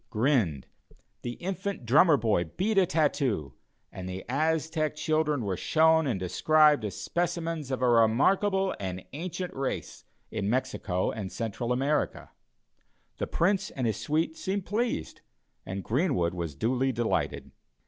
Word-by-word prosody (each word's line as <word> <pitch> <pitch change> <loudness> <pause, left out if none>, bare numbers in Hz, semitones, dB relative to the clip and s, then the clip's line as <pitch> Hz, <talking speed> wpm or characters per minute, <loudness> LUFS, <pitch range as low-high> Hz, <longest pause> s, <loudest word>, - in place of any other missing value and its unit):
grinned; 110 - +1 0.6
the 120 - -4
Infant 190 -2 -4
Drummer 150 +6 +6
boy 105 -8 +1
beat 195 - -1
a 185 - +3
tattoo; 140 - 0 0.4
and 95 0 -7
the 95 +1 -6
Aztec 155 +3 0
children 150 -4 0
were 95 -2 -1
shown 160 - +3
and 115 -8 -1
described 150 - +4
as 105 - -4
specimens 165 -4 -2
of 130 -1 -2
a - - +4
remarkable 185 - +3
and 95 -2 -5
ancient 180 +4 -4
race 135 -1 -4 0.3
in 105 -2 -2
Mexico 100 -6 -1
and 100 -3 -5
Central 115 +1 -3
America. 140 +4 0 0.9
The - - -1
Prince 190 +2 +1
and 130 - -3
his 110 -4 0
suite 160 +1 -1
seemed 190 +2 -3
pleased, 230 +4 -2 0.5
and 95 0 -4
Greenwood 125 - +1
was 85 -5 -4
duly 130 - +1
delighted. 120 -2 -1
135 Hz, 140 wpm, -28 LUFS, 110-160 Hz, 0.9 s, Drummer